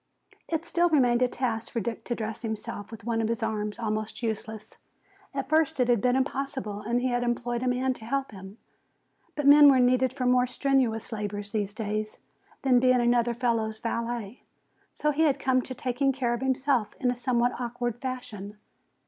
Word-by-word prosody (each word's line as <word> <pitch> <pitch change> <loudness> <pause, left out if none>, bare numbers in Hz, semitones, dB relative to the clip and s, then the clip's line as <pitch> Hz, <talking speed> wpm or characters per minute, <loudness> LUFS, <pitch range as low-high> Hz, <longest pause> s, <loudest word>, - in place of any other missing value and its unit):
It 325 0 -2
still 345 +1 +2
remained 250 -6 +3
a 250 - +5
task 235 -3 -3
for 235 - -1
Dick 225 +2 -4
to 240 - -2
dress 220 -1 -5
himself 220 -3 -5
with 225 -2 -10
one 230 0 0
of 220 - 0
his 230 0 -2
arms 210 -1 -2
almost 215 0 -3
useless. 220 -1 -5 0.5
At 275 -1 -4
first 315 -1 +2
it 250 -1 +2
had 235 -4 +3
been 250 +2 +2
impossible 265 -5 -2
and 235 +3 0
he 255 - +1
had 245 0 0
employed 240 0 -1
a 255 - -1
man 255 +1 +1
to 225 - -12
help 275 +2 -2
him. 195 +1 -11 0.8
But 295 - -2
men 290 0 +9
were 265 -2 +5
needed 250 0 +3
for 260 -1 -3
more 250 0 +4
strenuous 250 -3 0
labors 205 -1 -4
these 205 -2 -2
days 215 0 -3 0.5
than 255 -2 +5
being 255 0 +4
another 240 0 +2
fellow's 230 -3 0
valet. 230 -1 -4 0.5
So 300 - 0
he 295 +2 -1
had 290 -4 +3
come 260 -2 +2
to 255 - -7
taking 255 +3 0
care 250 -3 -1
of 240 - -3
himself 265 -3 0
in 250 -3 +2
a - - -3
somewhat 245 0 0
awkward 240 -1 -3
fashion. 235 -6 -6
240 Hz, 190 wpm, -27 LUFS, 220-260 Hz, 0.8 s, men